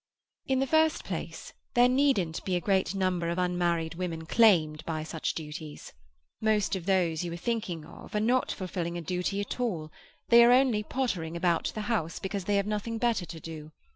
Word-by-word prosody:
"In 265 - +2
the 270 - +2
first 315 +3 +2
place, - - -6 0.2
there 245 0 +6
needn't 250 - +1
be 185 - -1
a - - +2
great 190 +1 +1
number 185 -3 0
of 170 - -2
unmarried 175 -2 0
women 165 -2 -4
claimed 160 -8 +4
by 155 -1 -3
such 160 0 -3
duties. 150 -1 -8 0.5
Most 215 -3 +2
of 185 -1 -6
those 180 -4 +2
you 175 - -4
are - - -5
thinking 180 -6 -3
of 170 - -11
are - - +2
not 245 +4 +2
fulfilling 175 -2 -4
a - - -4
duty 180 +4 -2
at 205 - -5
all; 170 -11 -2 0.4
they 235 0 +8
are 240 - +6
only 250 -4 +4
pottering 195 -9 -2
about 170 -1 +1
the 215 - -2
house, 210 -7 -1
because 195 -1 -4
they 205 - +1
have 200 -1 +2
nothing 210 +2 -2
better 225 -6 0
to 165 - -8
do. 155 -1 -9
185 Hz, 195 wpm, -29 LUFS, 165-220 Hz, 0.5 s, they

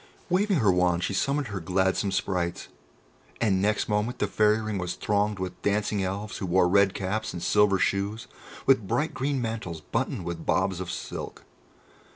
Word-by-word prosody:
Waving 195 +1 +3
her 100 -3 +5
wand, 90 -1 +2
she 100 - -1
summoned 140 +6 0
her 100 -2 -4
"gladsome 95 +3 +1
sprites," 90 -2 -2 0.7
and 100 -5 +2
next 105 +1 +1
moment 105 +3 0
the - - +1
Fairy 105 +2 +3
Ring 110 -2 -3
was 90 0 -3
thronged 105 0 0
with 95 -1 -5
dancing 105 0 0
Elves 100 +3 -3
who 95 - -3
wore 90 0 +4
red 100 +1 +4
caps 105 +3 -2
and 85 - -5
silver 105 -2 +4
shoes, 100 +4 -1 0.4
with 120 -7 +4
bright 150 +9 0
green 135 0 -1
mantles 110 -8 -4
buttoned 75 -1 -3
with 85 -1 -4
bobs 95 -3 +1
of 90 -1 -5
silk. - - -6
100 Hz, 175 wpm, -27 LUFS, 95-110 Hz, 0.7 s, her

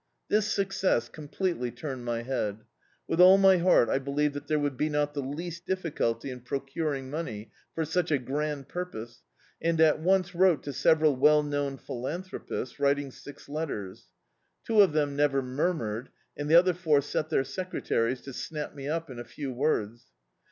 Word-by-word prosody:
This 210 0 +2
success 195 - +1
completely 155 -3 -3
turned 130 -1 -6
my 120 -1 -2
head. 110 -4 -2 0.4
With 170 - +2
all 185 +2 +9
my 195 -1 +6
heart 175 -8 +4
I - - +1
believed 145 +2 0
that 145 0 -7
there 155 - +1
would 145 -3 -2
not 150 -1 +1
be 145 - -2
the 130 - -5
least 170 +4 -6
difficulty 140 -10 -1
in 125 - -7
pro* 130 +3 -2
curing 135 -1 -3
money 110 -10 -5 0.2
for 160 - 0
such 170 +2 0
a 150 - +3
grand 140 +2 -3
purpose, 120 -10 -6 0.4
and 165 0 +1
at 155 -1 +5
once 185 +2 +2
wrote 180 -2 +3
to 140 - -5
several 155 +1 +3
well 150 +3 +5
known 145 -2 -2
philanthropists, 140 +2 -5
writ 140 0 +3
ing 140 -2 -5
six 145 +2 -12
letters. 140 -11 -5 0.6
Two 220 -2 +5
of 190 -6 +4
them 145 -2 +1
never 140 -2 +2
murmured, 125 -4 -2 0.3
and 145 0 -4
the 160 - +6
other 180 +1 +6
four 160 -5 +2
set 150 +2 -3
their 135 - +2
secretaries 130 -6 -2
to 135 - -9
snap 150 +3 -5
me 140 -1 -7
up 165 +1 -2
in 125 -3 -9
a - - -5
few 135 +1 -6
words. 120 -4 -1
145 Hz, 180 wpm, -28 LUFS, 130-165 Hz, 0.6 s, all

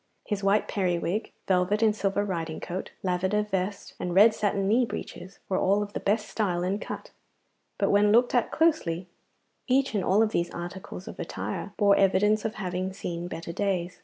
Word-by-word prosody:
His 205 -2 -3
white 200 +2 +3
periwig, 185 +2 -1 0.2
velvet 190 +3 +2
and 215 -2 +4
silver 200 0 0
riding 165 -5 -3
coat, 180 +2 -5
lavender 190 +3 +1
vest 195 -1 -3
and 180 -1 -3
red 215 +3 +7
satin 200 -2 0
knee 230 +5 +4
breeches 185 -4 -6
were 185 - 0
all 200 +2 +2
of 205 0 -9
the - - -2
best 210 +1 0
style 180 -5 -1
and 195 +3 -1
cut, - - -7 0.7
but - - +1
when 205 +1 +4
looked 240 +3 +4
at 245 -2 +2
closely, 190 - +1 0.6
each 270 0 +2
and 200 -3 0
all 205 +5 +4
of 215 - 0
these 170 -4 0
articles 175 +1 -7
of - - -9
attire 105 - -4
bore 200 -1 +5
evidence 210 +2 +3
of 220 - -2
having 185 -1 -3
seen 175 -2 -5
better 165 -1 -6
days. 180 -2 -1
195 Hz, 185 wpm, -27 LUFS, 180-210 Hz, 0.7 s, red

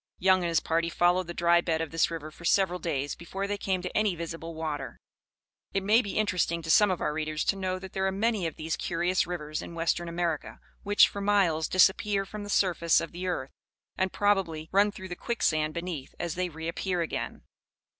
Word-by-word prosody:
Young 185 0 +4
and 170 - -1
his 165 - +3
party 165 +1 0
followed 175 +1 +2
the 175 - -5
dry 170 0 +4
bed 165 -2 0
of 160 -2 -3
this 165 0 +2
river 160 -2 -6
for 170 - -15
several 180 +1 +2
days 145 -5 -2
before 190 +3 -5
they 205 0 -3
came 185 -2 -1
to 180 - -5
any 210 -4 +2
visible 165 0 -6
water. 155 -2 -4 0.8
It 195 - +1
may 215 +4 +5
be 205 -5 -5
interesting 180 -5 0
to 160 - 0
some 210 +3 +6
of 185 - -1
our 150 - 0
readers 155 0 -2
to - - +1
know 185 -1 -2
that 190 0 -10
there 190 0 0
are - - +1
many 205 -2 0
of 160 - -6
these 160 +1 -3
curious 175 +1 0
rivers 155 -4 -4
in 170 - -8
western 170 +1 0
America, 170 -2 -2 0.2
which, 205 0 +5
for 200 - -6
miles 190 -6 +2
disappear 195 +1 +3
from 210 +2 -7
the 205 - -7
surface 175 -4 +3
of 165 - -5
the 180 +2 -5
earth, 135 -7 -2 0.4
and, 190 0 0
probably, 190 -6 0
run 205 +2 +4
through 190 -2 -9
the 175 - -4
quicksand 155 -9 0
beneath, 170 -5 -5
as 170 -2 -2
they 180 0 -2
reappear 170 +3 -3
again. 165 - -4
175 Hz, 215 wpm, -28 LUFS, 165-190 Hz, 0.8 s, some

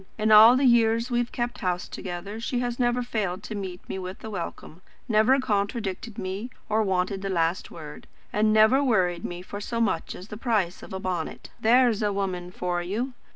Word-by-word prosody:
In 215 0 +1
all 220 +4 +9
the 275 - +2
years 230 0 +3
we've 240 0 0
kept 240 0 -3
house 180 -1 -1
together 190 +4 -6
she 245 +2 -2
has 245 0 -2
never 245 0 +1
failed 200 -5 -3
to 215 - -6
meet 190 -3 -6
me 190 - -4
with 185 +1 -7
a 220 - -6
welcome, 175 -2 -6 0.3
never 230 +5 +4
contradicted 210 -1 -2
me 195 +6 -4 0.2
or 215 +1 +2
wanted 190 -1 0
the 195 - -3
last 170 -1 0
word, 150 -3 -10 0.3
and 215 +1 +3
never 220 +6 +5
worried 180 -9 +1
me 175 0 -5
for 205 +2 -7
so 230 +3 -3
much 190 -8 0
as 185 +4 -11
the 210 - -7
price 210 -7 0
of - - -11
a 190 - -4
bonnet. 180 -4 -4
There's 240 -1 +4
a 210 -1 +1
woman 185 -3 -3
for 180 -1 -2
you! 220 +9 -3
210 Hz, 200 wpm, -26 LUFS, 185-230 Hz, 0.3 s, all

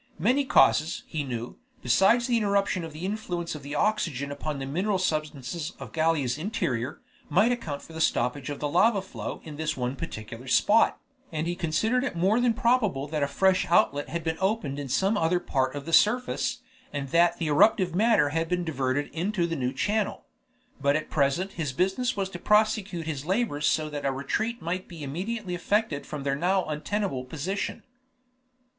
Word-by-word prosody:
Many 260 +6 +2
causes, 160 -10 +3
he 155 -3 -3
knew, 120 -3 -5 0.2
besides 230 +5 +4
the 245 -1 +1
interruption 200 -4 +1
of 165 - -6
the 155 +4 -6
influence 185 -4 -3
of 150 - -7
the 140 +2 -6
oxygen 150 - 0
upon 145 +1 -4
the 135 - -4
mineral 185 +9 0
substances 155 -1 -2
in - - -7
Gallia's 155 -5 +1
interior, 130 - -2 0.3
might 200 +10 +4
account 155 -13 -3
for 165 - -13
the 160 - -4
stoppage 125 +1 0
of 145 - -5
the 150 - -1
lava 200 +6 +3
flow 190 - -6
in 150 -2 -9
this 155 -2 -2
one 125 +1 -2
particular 115 0 -7
spot, 120 - +4 0.3
and 155 0 -2
he 175 - -1
considered 190 +9 +1
it 270 - -3
more 195 +8 +2
than 240 -2 +2
probable 225 - +1
that 155 -1 -2
a 140 - +2
fresh 190 +4 +2
outlet 145 -9 +2
had 170 0 -3
been 160 0 -1
opened 190 -8 -1
in 140 -2 -5
some 195 - +2
other 170 +1 +2
part 130 -4 -1
of 140 -1 -5
the 165 - -5
surface, 245 +8 +2 0.3
and 140 -2 -4
that 170 +2 +4
the 165 - -2
eruptive 185 +3 +4
matter 215 -5 +4
had 165 +2 -1
been 180 0 0
diverted 140 -3 -1
into 180 +2 0
the 165 -1 -2
new 125 -3 -1
channel. 210 +4 -1 0.6
But 140 0 +3
at 155 - -3
present 155 +6 +1
his 155 -8 -3
business 195 - 0
was 195 -1 0
to 175 - -8
prosecute 210 -4 +2
his 145 -4 -3
labors 185 -8 0
so 155 -1 +1
that 145 -1 -4
a - - +2
retreat 220 - -2
might 180 +3 -3
be 165 -4 -9
immediately 185 +7 -4
effected 175 -4 0
from 150 -2 -5
their 140 0 0
now 185 +5 +1
untenable 155 -1 -2
position. 160 +9 -4
165 Hz, 190 wpm, -27 LUFS, 145-200 Hz, 0.6 s, besides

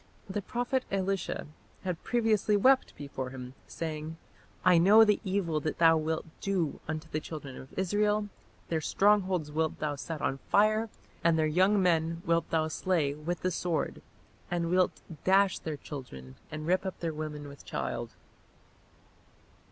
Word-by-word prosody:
The 200 +1 -3
prophet 245 +5 -1
Elisha 195 -1 -1 0.4
had 180 -4 -3
previously 220 -3 +2
wept 260 +5 +4
before 135 -3 -5
him, 125 -1 -8
saying, 160 0 -5 0.5
"I 180 -2 +7
know 205 +6 +8
the 210 -1 +3
evil 185 -6 0
that 155 +1 -3
thou 165 -1 +6
wilt 160 0 -1
do 185 -6 -1
unto 155 +1 -4
the 155 - -2
children 145 -4 -7
of 130 - -12
Israel; 210 +2 +1 0.4
their 160 -2 0
strongholds 190 -4 +2
wilt 160 +1 0
thou 150 -1 -2
set 155 +3 -5
on 135 -1 -1
fire, 215 +2 +3 0.3
and 165 -1 +4
their 160 - +3
young 185 +6 +3
men 165 -1 +1
wilt 165 0 +1
thou 160 -1 +1
slay 160 -2 0
with 155 +4 -4
the 185 - +1
sword, 175 -2 -2 0.5
and 170 -1 -1
wilt 185 0 +2 0.2
dash 195 0 +4
their 155 -2 -4
children 95 - -9 0.2
and 155 0 -6
rip 185 +3 +2
up 190 -1 -5
their 165 -2 -2
women 150 -1 -5
with 140 -1 -12
child". 120 -1 -4
165 Hz, 155 wpm, -30 LUFS, 155-195 Hz, 0.5 s, know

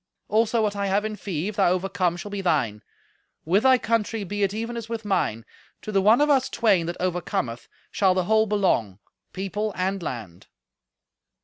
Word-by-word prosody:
Also 225 +1 +2
what 205 -1 0
I 200 0 -1
have 200 +2 +1
in 215 0 -3
fee, 185 -4 -4
if 210 - -8
thou 195 - +4
overcome, 185 -1 -1
shall 205 +4 -7
be 200 -1 -3
thine. 130 - 0 0.6
With 185 +6 +3
thy 260 0 +5
country 225 -2 -1
be 205 +2 -4
it 195 -1 +2
even 230 +3 -4
as 230 -1 -6
with 225 -2 -4
mine. 115 - -1 0.4
To 215 - -5
the 195 -2 +2
one 220 +7 +5
of 295 - +4
us 270 -3 +3
twain 195 -7 +2
that 175 - -4
overcometh 175 -10 -2 0.2
shall 190 -2 +2
the 185 - +1
whole 220 +3 +3
belong, 185 - +1 0.3
people 200 +3 -3
and 190 +1 -1
land." 110 - -7
200 Hz, 190 wpm, -24 LUFS, 175-215 Hz, 0.6 s, thy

